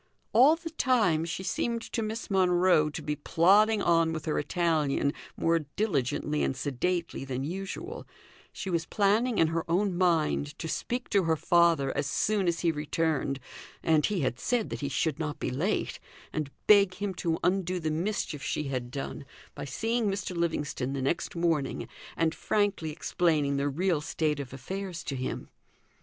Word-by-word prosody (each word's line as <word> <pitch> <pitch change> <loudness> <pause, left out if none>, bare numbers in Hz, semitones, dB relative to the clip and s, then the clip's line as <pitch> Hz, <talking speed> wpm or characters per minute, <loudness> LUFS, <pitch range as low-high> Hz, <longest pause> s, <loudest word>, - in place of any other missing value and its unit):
All 265 +8 +7
the 330 -1 -8
time 220 - +2
she 170 +3 -4
seemed 230 +4 -1
to 230 - 0
Miss 220 0 -4
Monro 180 -4 +4
to 150 - -6
be 150 - -1
plodding 200 +8 +4
on 165 -1 +3
with 155 -2 -5
her 155 - 0
Italian 150 -3 +1 0.2
more 165 0 +2
diligently 150 - -1
and 130 - 0
sedately 155 +5 -2
than 135 -1 -3
usual, 195 - -5 0.4
she 190 - -5
was 170 -1 0
planning 215 +4 +2
in 160 - +4
her 165 0 -1
own 185 +2 +1
mind 160 -4 +1
to 165 - -5
speak 245 +9 -3
to 200 -4 +3
her 160 -1 +3
father 165 -4 +3
as 145 - 0
soon 205 +5 +1
as 170 0 0
he 170 - +3
returned 150 -2 -1 0.4
(and 155 -2 +3
he 205 -5 -1
had 125 -2 -1
said 245 -3 0
that - - -4
he 140 - -1
should 155 +2 0
not 150 -2 -3
be - - -2
late), 165 +12 -1 0.3
and 155 -3 -2 0.2
beg 200 -3 +6
him 200 0 -3
to 165 -2 -1
undo 185 -1 +1
the 160 -2 -1
mischief 165 -2 -2
she 150 - -2
had 130 -4 -3
done 140 +2 -5 0.3
by - - -6
seeing 225 - 0
Mr. 195 -2 -3
Livingstone 150 -6 -1
the 135 - -2
next 140 +6 -1
morning, 165 -5 0 0.3
and 165 -1 +2
frankly 205 -6 0
explaining 150 -2 +1
the 140 +1 +1
real 170 +2 0
state 155 -1 -1
of 135 -3 -6
affairs 180 +6 -5
to 140 - -4
him. 130 0 -4
165 Hz, 175 wpm, -29 LUFS, 150-195 Hz, 0.4 s, All